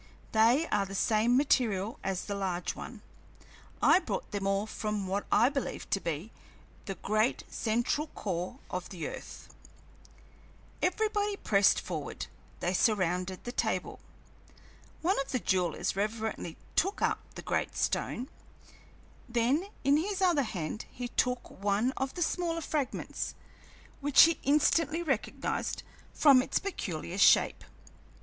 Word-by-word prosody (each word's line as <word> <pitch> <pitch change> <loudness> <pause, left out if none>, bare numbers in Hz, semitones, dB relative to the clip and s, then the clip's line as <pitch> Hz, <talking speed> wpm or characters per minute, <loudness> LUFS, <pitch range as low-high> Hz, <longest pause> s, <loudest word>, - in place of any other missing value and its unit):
"They 230 +8 +4
are 205 - +3
of 195 - -2
the 195 - -7
same 225 +5 +3
material 230 -7 +1
as 190 -1 -2
the 205 - -3
large 185 -3 -2
one. - - -9 0.8
I - - +7
brought - - -4
them 200 -1 -2
all 195 +1 +1
from 210 -2 -3
what 195 +2 -2
I 240 - +6
believe 275 0 -3
to 195 - +2
be 170 +4 -4 0.5
the 195 - -4
great 215 +6 0
central 240 +7 0
core 185 - -4
of 180 -1 -4
the 170 -5 -5
earth." - - -9 1.3
Everybody 415 +2 +1
pressed 200 - +4
forward, - - -5 0.4
they 175 - 0
surrounded 185 -2 +1
the 240 - -4
table. - - -1 1.0
One 370 +1 +2
of 275 - -2
the 255 - +1
jewelers 185 -8 0
reverently 215 -4 -3 0.2
took 390 +4 +2
up - - +2 0.2
the - - -7
great - - -1
stone; 250 - -1 1.0
then 245 +10 +1 0.2
in 280 +2 +5
his 385 +5 -1
other 350 -6 +4
hand 195 - -4
he 245 0 -6
took 250 +1 0 0.2
one 205 +5 +2
of 265 0 -3
the 350 - +1
smaller 335 0 -1
fragments, 295 -4 -3 0.6
which 285 -1 +7
he 330 0 +4
instantly 305 +3 +2
recognized 270 -9 -2 0.3
from 275 -4 +6
its - - -1
peculiar 185 - -4
shape. - - +5
230 Hz, 135 wpm, -30 LUFS, 195-290 Hz, 1.3 s, I